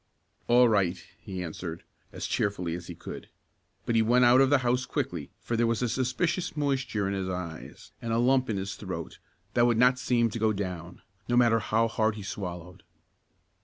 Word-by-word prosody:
"All 120 +1 +6
right," 100 -5 +2 0.2
he 95 -1 -6
answered, 85 0 -6 0.3
as - - -5
cheerfully 90 -5 -1
as 85 0 -6
he 85 - -7
could, - - -9 0.6
but 120 - 0
he 115 - +4
went 120 +3 +4
out 125 +2 +6
of 135 - +4
the 145 - +5
house 125 +1 +1
quickly - - -3
for 120 - -3
there 115 0 +2
was 115 +1 0
a - - +2
suspicious 155 +8 -1
moisture 130 -8 0
in 100 - -1
his 95 -1 -2
eyes, 90 -3 -7
and 115 - -3
a 115 - +2
lump 130 +1 +3
in 105 - 0
his 95 +1 -3
throat - - -6 0.3
that 120 0 +4
would 120 -2 +2
not 125 +2 +4
seem 120 -3 +2
to 115 - -4
go 110 0 +2
down, 90 -3 -5 0.3
no 120 - +3
matter 115 -2 +5
how 115 +1 +1
hard 110 -1 0
he 105 - -7
swallowed. 90 -3 -6
115 Hz, 200 wpm, -28 LUFS, 95-125 Hz, 0.6 s, All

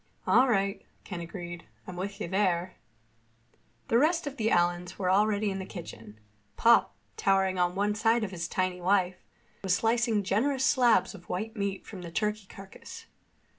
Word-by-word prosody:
"All 260 - +5
right," 195 -3 0 0.2
Ken 180 -3 -6
agreed. 175 0 -7 0.2
"I'm 180 - -8
with 200 +2 -5
you - - -3
there." 185 -1 0 1.1
The 230 - +3
rest 330 +4 +2
of 285 -1 -6
the 220 -2 +1
Allens 175 -1 +1
were 185 -2 0
already 205 +1 +2
in 195 - -4
the 190 - -5
kitchen. 110 - -10 0.4
Pop, 235 0 +4 0.2
towering 190 -1 +2
on 180 0 +1
one 205 +1 +1
side 225 +2 +2
of 200 - -3
his 170 -2 -4
tiny 185 0 -2
wife, 185 0 +1 0.4
was 190 -2 +2
slicing 225 -1 +1
generous 260 +8 +1
slabs 240 -10 +3
of 175 - -14
white 220 +5 -3
meat 200 -2 -3
from 195 -4 -9
the 170 - -7
turkey 210 +2 -2
carcass. 195 0 -11
195 Hz, 170 wpm, -29 LUFS, 180-220 Hz, 1.1 s, All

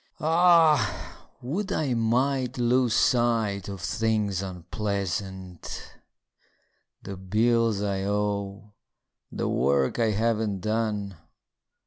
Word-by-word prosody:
Ah, 165 -2 +3 0.2
would 180 +11 -3
I 140 -5 0
might 125 +3 0
lose 120 -1 +2
sight 115 -6 +1
of 100 -2 -7
things 105 0 0
unpleasant: 95 -1 -5 1.1
The 100 - -6
bills 110 +3 +1
I 100 -1 -1
owe; 100 0 -2 0.6
the - - -2
work 70 - +1
I 115 -1 +3
haven't 110 -2 0
done. 105 -3 -2
105 Hz, 90 wpm, -26 LUFS, 100-120 Hz, 1.1 s, Ah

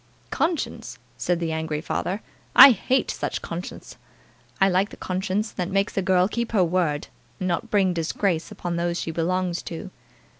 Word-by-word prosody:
"Conscience!" 325 -1 -2 0.2
said 175 -1 -1
the 165 -1 -2
angry 160 -1 -2
father. 190 +6 -3 0.3
"I 275 - +12
hate 250 +4 +1
such - - -4
conscience. - - -7 0.6
I 195 - +5
like 190 +2 +2
the - - -12
conscience 190 +3 -2
that 180 -1 -3
makes 195 +1 0
a 195 - +1
girl 185 -1 +3
keep 235 +2 -3
her 195 -4 +4
word, 165 -4 0 0.3
and 185 - -3
not 175 -2 -1
bring 195 -3 +2
disgrace 170 +1 -1
upon 175 -1 -4
those 170 0 -1
she 165 - -3
belongs 175 +2 -1
to." 180 +3 -7
185 Hz, 165 wpm, -24 LUFS, 170-195 Hz, 0.6 s, I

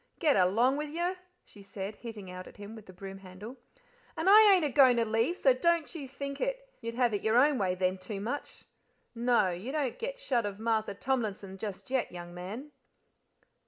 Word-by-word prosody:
"Get 305 -4 +3
along 225 +9 +3
with 300 0 -3
you," 345 +4 -1 0.3
she 205 - -15
said, 200 +1 -7
hitting 215 -6 -8
out 185 0 -8
at - - -14
him 205 +2 -9
with 220 -2 -12
the - - -10
broom 195 +1 -9
handle. 195 +7 -10 0.6
"And 320 - -1
I 420 +1 +9
ain't 365 -5 +4
a - - +1
goin' 260 -2 +6
to 230 - +2
leave, 225 +10 0
so 265 - +5
don't 335 +4 +1
you 295 -5 -6
think 280 +1 -6
it. - - -2
You'd 230 0 -5
have 245 -2 +2
it 205 - -1
your 220 +2 +2
own 280 +1 +4
way 185 -2 +1
then 185 0 0
too 195 +2 -6
much. 245 +8 -5 0.5
No; 235 -5 +2
you 185 +9 -5
don't 285 -5 -2
get - - -4
shut 255 - 0
of 200 -1 -6
Martha 220 -2 -1
Tomlinson 205 -6 -2
just 205 +3 -6
yet, 265 -2 0
young 175 -1 -8
man." 210 +12 -7
230 Hz, 205 wpm, -30 LUFS, 195-280 Hz, 0.6 s, I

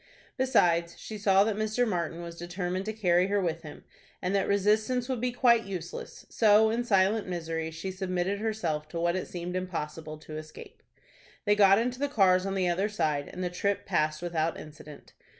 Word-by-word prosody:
Besides, 175 - +2
she 215 -1 -8
saw 195 -1 +5
that 215 0 0
Mr. 215 +3 0
Martin 170 -3 -2
was 170 0 -8
determined 180 +2 -4
to 215 - -2
carry 180 -4 +2
her 205 +1 +1
with 170 -3 -1
him, 150 -3 -11 0.4
and 180 +1 -2
that 195 -1 +1
resistance 215 +5 +1
would 255 -3 -2
be 250 0 0
quite 235 -2 +3
useless, 180 -4 -7
so 220 0 +4
in 235 +2 0
silent 200 -1 +2
misery 165 -2 -3
she 165 +4 -5
submitted 185 +1 -2
herself 175 -9 -2
to 165 +2 -5
what 170 +1 +1
it 185 - -3
seemed 175 0 -5
impossible 160 -4 -4
to 155 0 -9
escape. 155 0 -11 0.6
They 205 - +4
got 200 -1 +6
into 245 +3 -1
the 285 0 0
cars 190 -7 +3
on 195 - -2
the 185 -2 +1
other 190 +4 0
side, 155 -8 -1
and 185 - -5
the 180 - -2
trip 200 +3 -1
passed 155 -3 0
without 165 -2 -1
incident. 150 -1 -12
185 Hz, 190 wpm, -28 LUFS, 170-210 Hz, 0.6 s, got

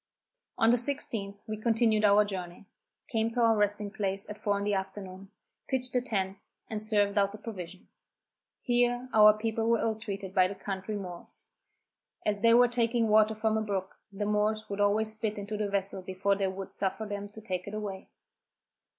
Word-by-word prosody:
On 225 0 +5
the 245 - +4
16th, 225 -6 -2
we 215 -1 -4
continued 225 -1 +2
our 205 +1 +6
journey, 185 -2 -6 0.4
came 225 -2 0
to 245 - -2
our 225 -1 +5
resting 205 0 0
place 195 -1 -2
at 210 - -6
four 205 -1 0
in 200 - -3
the 205 0 0
afternoon, 190 0 -5 0.4
pitched 255 -2 -2
the 250 - +2
tents, 195 -5 -3
and 215 -1 -3
served 205 -2 +2
out 200 0 +2
the 210 - -9
provision. 190 -5 -8 0.8
Here 245 0 +1
our 215 -1 +9
people 225 +1 -1
were 230 - +4
ill 225 0 0
treated 200 -3 -6
by 185 -1 +5
the 200 - -6
country 195 +2 -4
Moors. 180 -4 -8 0.8
As 205 -1 0
they 230 +2 +5
were 245 +1 +7
taking 235 -1 +1
water 215 +1 +5
from 220 0 +1
a - - 0
brook, 195 -3 -4
the 205 +1 -3
Moors 210 +1 0
would 200 +1 -2
always 215 +2 +3
spit 215 -1 -3
into 205 +1 -4
the 210 -1 -1
vessel 195 -1 -1
before 190 +2 0
they 195 -1 0
would 190 0 -6
suffer 195 +3 -2
them 205 -1 -5
to 210 - -12
take 185 -4 -4
it 205 - -5
away. 200 -3 -5
210 Hz, 190 wpm, -29 LUFS, 195-220 Hz, 0.8 s, our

